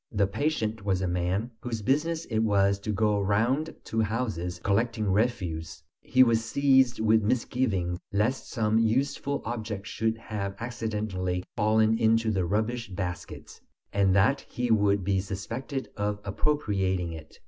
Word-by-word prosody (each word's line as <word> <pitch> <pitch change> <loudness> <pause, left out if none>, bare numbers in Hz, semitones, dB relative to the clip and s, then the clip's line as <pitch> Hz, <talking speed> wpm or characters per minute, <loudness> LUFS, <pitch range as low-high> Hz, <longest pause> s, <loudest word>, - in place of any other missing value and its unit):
The 100 -2 +2
patient 110 -2 -1
was 95 -2 0
a - - 0
man 90 +6 -1
whose 115 -3 -4
business 160 +7 0
it 110 -2 -1
was 100 -2 +3
to 105 +2 -3
go 105 0 +2
round 120 +10 +1
to 110 - -1
houses 105 -6 -2
collecting 110 +2 +1
refuse; 95 -8 -1 0.2
he 130 0 +5
was 115 -2 +2
seized 130 0 +3
with 110 0 +4
misgivings 105 -6 0
lest 105 +6 0
some 110 -2 +1
useful 135 +5 0
object 110 -3 -4
should 110 +1 -1
have 100 -3 -4
accidentally 105 -6 -3
fallen 110 0 +3
into 115 0 +3
the 95 -4 0
rubbish 110 +5 -1
baskets, 90 -2 -6 0.3
and 95 -2 +3
that 130 +9 +3
he 125 -1 -2
would 100 -2 +3
be 95 +1 +1
suspected 115 +8 -5
of 105 0 -2
appropriating 95 - 0
it. 80 -1 -11
110 Hz, 145 wpm, -27 LUFS, 100-120 Hz, 0.3 s, he